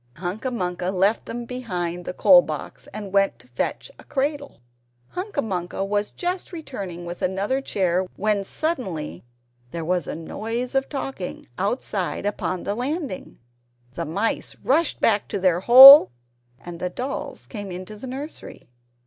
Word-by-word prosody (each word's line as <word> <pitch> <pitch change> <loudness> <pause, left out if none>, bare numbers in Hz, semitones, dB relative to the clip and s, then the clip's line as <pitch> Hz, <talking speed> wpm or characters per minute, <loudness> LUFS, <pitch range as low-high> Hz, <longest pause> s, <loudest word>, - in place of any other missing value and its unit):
Hunca 190 +9 -4
Munca 180 -6 -2
left 195 +3 +1
them 240 0 -5
behind 180 -8 -4
the - - -4
coal 270 -2 +7
box, - - -7
and 205 -2 -7
went 195 0 +2
to 125 - -20
fetch 125 - -3
a - - -13
cradle. 285 - -3 0.5
Hunca 365 -5 -3
Munca 185 -2 -3
was 205 +1 -1
just 360 +1 -4
returning 200 - -7
with 175 +1 -7
another 200 +8 0
chair, 185 -6 0
when 210 -1 0
suddenly 190 - -3 0.5
there 165 +4 -5
was 180 -2 0
a - - -4
noise 225 +9 -4
of 270 0 0
talking 270 -9 -5
outside 200 -2 -2
upon 185 -3 -2
the 200 - -2
landing. 265 - -4 0.6
The 170 - -4
mice 200 +9 -2
rushed 310 +4 +2
back 210 -2 +2
to 200 - -3
their 180 -2 +2
hole, 260 +4 +11 0.5
and 175 -1 -9
the 180 - -2
dolls 270 +7 -5
came 205 -4 -7
into 185 +4 -7
the 230 +5 -9
nursery. 275 +5 -8
205 Hz, 150 wpm, -23 LUFS, 180-265 Hz, 0.6 s, hole